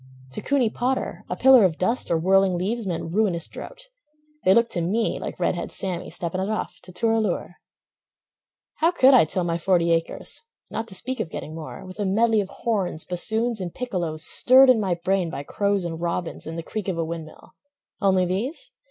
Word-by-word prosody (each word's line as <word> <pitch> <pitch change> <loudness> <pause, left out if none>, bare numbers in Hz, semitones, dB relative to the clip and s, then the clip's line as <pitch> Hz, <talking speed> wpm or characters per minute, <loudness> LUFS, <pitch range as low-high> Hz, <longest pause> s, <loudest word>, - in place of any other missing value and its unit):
To - - -5
Cooney 265 -6 +1
Potter 255 +2 -2
a - - -2
pillar 260 -3 +6
of 175 -4 +2
dust 230 +7 0
Or 170 - +2
whirling 190 +2 +3
leaves 210 +4 -2
meant 165 -2 -4
ruinous 190 -5 +1
drouth; - - -10 0.6
They 185 - +5
looked 235 0 +3
to 175 - -2
me 210 +7 -1
like - - -6
Red - - +1
Head - - -5
Sammy 180 -3 -3
Stepping 175 +2 -3
it 195 - -2
off, 215 - -4
to 185 - -11
"Toor 225 +5 0
a 225 - +2
Loor." 185 -4 -3 1.2
How 325 - +3
could 275 -6 +5
I 245 - +7
till 180 +4 -2
my 170 0 -1
forty 170 -2 +2
acres 165 0 -2 0.3
Not 225 +1 -4
to 195 - -2
speak 255 +6 0
of 190 - -3
getting 155 - -7
more, 160 +2 -8
With 185 +3 -11
a 205 - 0
medley 220 +3 +2
of 195 - -6
horns, 195 -10 -2
bassoons 220 +5 +2
and 175 -2 -6
piccolos 175 -10 -3
Stirred 260 +6 +7
in 240 - +2
my 190 -4 0
brain 185 0 -1
by 140 -2 -6
crows 200 +3 0
and 165 -1 -5
robins 170 -1 -3
And 165 +1 -6
the 165 - -4
creak 210 +3 -5
of 185 -3 -2
a 165 - -1
wind 165 0 -5
mill—only 195 - -3
these? 210 - -3
190 Hz, 205 wpm, -24 LUFS, 170-230 Hz, 1.2 s, I